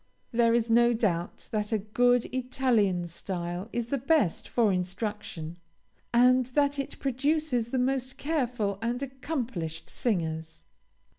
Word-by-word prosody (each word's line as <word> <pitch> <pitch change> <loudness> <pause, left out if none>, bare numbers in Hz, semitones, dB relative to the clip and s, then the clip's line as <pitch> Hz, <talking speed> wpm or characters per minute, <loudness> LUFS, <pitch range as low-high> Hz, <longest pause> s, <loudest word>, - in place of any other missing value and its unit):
There 230 0 +4
is 235 -1 +1
no 235 +1 +5
doubt 180 -7 -1
that 210 0 -1
a 220 - +3
good 245 +4 +2
Italian 245 -8 +1
style 175 +2 -5
is 240 0 -1
the 280 - +1
best 240 - +2
for 225 -5 +2
instruction, 180 -3 -4 0.5
and 250 +1 +5
that 285 -1 +3
it 275 - -4
produces 275 -2 0
the 260 - -1
most 260 0 0
careful 245 -10 -1
and 240 +3 -1
accomplished 250 - -4
singers. 160 -6 -2
235 Hz, 130 wpm, -28 LUFS, 190-255 Hz, 0.5 s, no